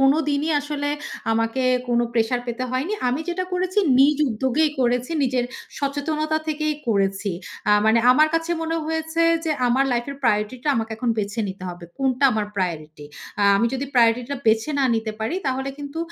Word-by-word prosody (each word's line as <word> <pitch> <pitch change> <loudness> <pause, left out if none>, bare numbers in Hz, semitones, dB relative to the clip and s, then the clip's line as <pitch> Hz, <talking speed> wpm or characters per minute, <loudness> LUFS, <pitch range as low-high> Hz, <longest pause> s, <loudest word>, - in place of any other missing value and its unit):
কোনো 270 +2 +5
দিনই 290 +2 0
আসলে 290 0 -3 0.4
আমাকে 225 +3 0 0.3
কোনো 240 0 +2
প্রেশার 235 +1 +1
পেতে 240 +2 -3
হয়নি। 260 +10 -1 0.2
আমি 255 +5 -1
যেটা 365 +1 -1
করেছি 365 +2 0 0.2
নিজ 285 +2 +5
উদ্যোগেই 265 +7 +1
করেছি, 245 +3 +1
নিজের 255 -2 +1 0.3
সচেতনতা 305 +2 -1
থেকেই 305 0 -1
করেছি। 195 -1 +1 0.4
আ - - +5 0.2
মানে 220 +1 +5
আমার 310 +4 +5
কাছে 330 +1 0
মনে 325 0 -1
হয়েছে 320 +1 -1 0.2
যে 320 - -1 0.2
আমার 255 +3 +3
লাইফ 240 0 0
এর 280 - -7
প্রায়োরিটিটা 230 +5 0
আমাকে 225 0 -2
এখন 235 0 -1
বেছে 210 +2 -2
নিতে 190 0 -8
হবে। 175 0 -10
কোনটা 265 0 +1
আমার 215 -1 -1
প্রায়োরিটি 155 -5 -3 0.4
আ - - +3
আমি 220 +4 +2
যদি 265 +1 -2
প্রায়োরিটি 235 0 +4
টা - - -2
বেছে 220 +6 +3
না 275 - +3
নিতে 225 -1 -2
পারি, 220 +9 -1
তাহলে 265 +1 -1
কিন্তু 285 +2 -6
255 Hz, 180 wpm, -22 LUFS, 225-300 Hz, 0.4 s, কোনো